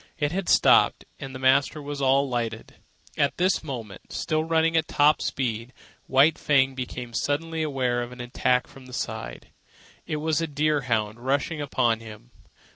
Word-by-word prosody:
It 145 -2 0
had 190 +1 -2
stopped, - - +4
and 135 -1 -7
the - - -4
master 135 +3 +2
was 145 -1 -6
alighting. 130 -5 0 0.5
At 140 - +1
this 185 +1 +1
moment, 115 -10 -8
still 155 -1 -1
running 165 0 +1
at 160 -1 +2
top 150 +1 +3
speed, 120 -1 -3 0.3
White 140 +4 +4
Fang 135 -2 +3
became 125 -2 -6
suddenly 160 +5 -1
aware 130 -5 0
of 120 0 -6
an 125 - -11
attack 125 +1 0
from 130 -1 -15
the 125 - -12
side. - - -5 0.6
It - - -2
was 155 +1 0
a 165 - -1
deer 150 0 +1
hound 110 -2 -1
rushing 140 +5 -1
upon 120 -5 +1
him. 105 - -12
135 Hz, 165 wpm, -25 LUFS, 120-150 Hz, 0.6 s, stopped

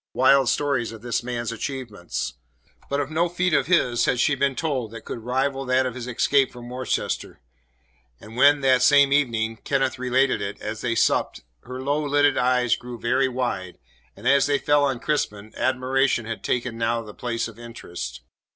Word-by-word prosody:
wild 130 0 +5
stories 135 -6 0
of 110 0 -11
this 120 -1 -1
man's 120 -1 -3
achievements. 115 - -5 0.6
But 140 - 0
of 145 +1 -3
no 170 +2 +1
feat 180 0 0
of 135 - +2
his 125 -9 +2
had 125 - +1
she 145 - +3
been 140 0 0
told 135 -8 -2
that 115 0 -10
could - - -5
rival 135 +3 -1
that 130 +1 +2
of 130 - -2
his 125 0 -7
escape 130 +2 +2
from 120 0 -10
Worcester; 130 +1 -3 0.8
and 110 +2 -12
when, 145 +3 +5
that 130 -2 +4
same 140 +1 +5
evening, 115 -6 +1
Kenneth 135 0 -1
related 130 -2 +1
it, 100 0 -5
as 105 +1 -5
they 115 -2 -1
supped, - - +1 0.2
her 130 +1 -7
low 145 +2 0
lidded 145 0 +3
eyes 125 -1 +2
grew 125 -1 -9
very 130 +4 +1
wide, 120 -8 -3 0.4
and 110 +5 -6
as 140 0 +4
they 145 -1 +2
fell 145 0 +2
on 135 -3 -1
Crispin, 110 -8 -2
admiration 130 -1 +1
had 115 0 -6
taken 120 -2 -2
now 115 0 0
the 105 -1 -11
place 115 0 -3
of 115 0 -13
interest. 85 - -7
125 Hz, 185 wpm, -24 LUFS, 115-140 Hz, 0.8 s, wild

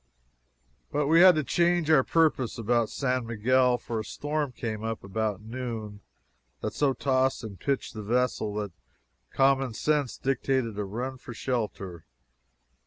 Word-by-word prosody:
But 145 0 +1
we 165 +4 +5
had 185 -2 +9
to 155 - +1
change 170 +3 +2
our 145 -4 +6
purpose 155 -7 +1
about 115 0 +1
San 130 -3 -1
Miguel, 125 +3 +3
for 115 -1 -4
a - - -3
storm 145 +5 -3
came 110 -3 -5
up 115 0 -3
about 105 0 -2
noon 110 -3 -6 0.6
that - - -3
so 140 -2 +2
tossed 130 -1 +1
and 100 -5 -8
pitched 140 +5 -2
the 110 - -6
vessel 115 -1 0
that 105 -2 -3 0.6
common 135 -3 +2
sense 145 -4 0
dictated 130 -5 -1
a 105 - -1
run 125 +6 -4
for 120 - -9
shelter. 105 -9 -3
125 Hz, 150 wpm, -27 LUFS, 110-135 Hz, 0.6 s, had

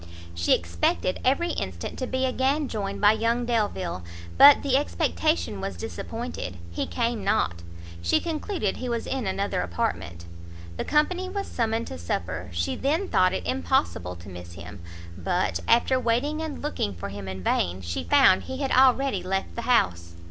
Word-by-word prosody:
She 85 0 +3
expected 85 - -1
every 305 +7 +2
instant 95 - -5
to 255 - -2
be 260 +1 0
again 270 +3 +1
joined 200 -4 -4
by 205 0 +6
young 230 +2 0
Delvile, 205 - -1 0.3
but 285 0 +8
the 275 -2 +2
expectation 290 - 0
was 195 0 -4
disappointed; 225 - -5
he 85 - -2
came 235 -2 -1
not; 85 0 +1 0.4
she 85 - +2
concluded 325 - -2
he 250 - -4
was 235 -1 -2
in 260 -6 -2
another 195 - -1
apartment; 85 -1 -3 0.5
the - - -3
company 360 +5 +1
was 395 +1 -3
summoned 230 -1 -1
to 85 - -7
supper, 85 0 -3
she 85 0 -1
then 320 +8 0
thought 185 0 +4
it 90 - -3
impossible 85 +1 0
to 85 +2 -13
miss 90 -1 -9
him; 95 +2 -10 0.3
but, 85 -1 -1
after 255 +2 +4
waiting 255 +6 0
and 315 -3 -5
looking 105 - -2
for 85 +3 -6
him 100 -1 -7
in 95 -1 -6
vain, 90 +1 0
she 85 0 -3
found 85 - +5
he 260 - -5
had 275 -1 -2
already 260 -4 +4
left 190 +2 -2
the 235 - -3
house. 85 - +2
205 Hz, 170 wpm, -26 LUFS, -, 0.5 s, but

